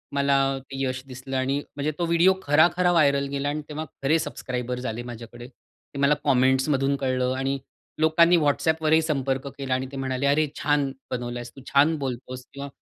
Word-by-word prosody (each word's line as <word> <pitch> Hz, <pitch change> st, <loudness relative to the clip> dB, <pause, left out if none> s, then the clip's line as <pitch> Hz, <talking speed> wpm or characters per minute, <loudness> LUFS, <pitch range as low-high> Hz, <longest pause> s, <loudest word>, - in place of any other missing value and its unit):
मला 140 Hz, 0 st, +2 dB, 0.3 s
ते 135 Hz, 0 st, -8 dB
यश 130 Hz, 0 st, -2 dB
दिसलं 130 Hz, +1 st, -5 dB
आणि 135 Hz, +2 st, 0 dB, 0.2 s
म्हणजे 145 Hz, +1 st, -1 dB
तो 170 Hz, -, +1 dB
व्हिडिओ 170 Hz, +3 st, +4 dB
खरा-खरा 175 Hz, +5 st, +4 dB
व्हायरल 140 Hz, -4 st, +3 dB
गेला 140 Hz, +1 st, -2 dB
आणि 150 Hz, +1 st, -3 dB
तेव्हा 155 Hz, +1 st, -4 dB, 0.2 s
खरे 155 Hz, +4 st, +3 dB
सबस्क्रायबर्स 125 Hz, -4 st, -4 dB
झाले 120 Hz, 0 st, -4 dB
माझ्याकडे. 120 Hz, 0 st, -9 dB
ते 135 Hz, +2 st, -15 dB
मला 140 Hz, +1 st, +4 dB
कमेंट्समधून 135 Hz, +1 st, +2 dB
कळलं 130 Hz, -1 st, 0 dB
आणि 135 Hz, +1 st, -1 dB, 0.4 s
लोकांनी 170 Hz, +2 st, +5 dB
WhatsAppवरही 160 Hz, +1 st, +2 dB
संपर्क 135 Hz, -3 st, -1 dB
केला 135 Hz, -2 st, -2 dB
आणि 130 Hz, 0 st, -1 dB
ते 140 Hz, -, -7 dB
म्हणाले, 130 Hz, 0 st, -2 dB
"अरे, 150 Hz, +2 st, +3 dB
छान 145 Hz, -2 st, +1 dB, 0.2 s
बनवला 120 Hz, -1 st, -3 dB
आहेस 120 Hz, 0 st, -8 dB
तू, 135 Hz, -, -11 dB
छान 150 Hz, +3 st, +5 dB
बोलतोस 130 Hz, -2 st, -5 dB
किंवा 140 Hz, 0 st, -6 dB
140 Hz, 175 wpm, -25 LUFS, 130-150 Hz, 0.4 s, लोकांनी